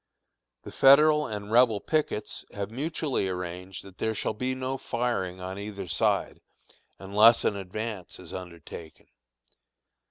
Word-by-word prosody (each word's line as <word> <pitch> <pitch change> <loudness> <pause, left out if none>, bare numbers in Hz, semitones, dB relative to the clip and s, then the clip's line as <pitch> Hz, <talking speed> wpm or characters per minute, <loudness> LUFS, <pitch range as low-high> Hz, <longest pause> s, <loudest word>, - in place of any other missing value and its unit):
The - - -9
Federal 150 +2 +6
and 105 -1 -6
Rebel 115 -3 +5
pickets 155 -4 -2
have 100 +1 -4
mutually 140 - -2
arranged 90 +1 -6
that 95 -1 -15
there 110 0 -1
shall - - -1
be 125 +4 -2
no 130 +1 -3
firing 115 -7 -2
on 95 +1 -6
either 100 -2 -6
side, 80 -1 0 0.6
unless 105 +4 +5
an 100 - +2
advance 100 0 -5
is - - -10
undertaken. 85 -3 -9
105 Hz, 130 wpm, -27 LUFS, 95-125 Hz, 0.6 s, Federal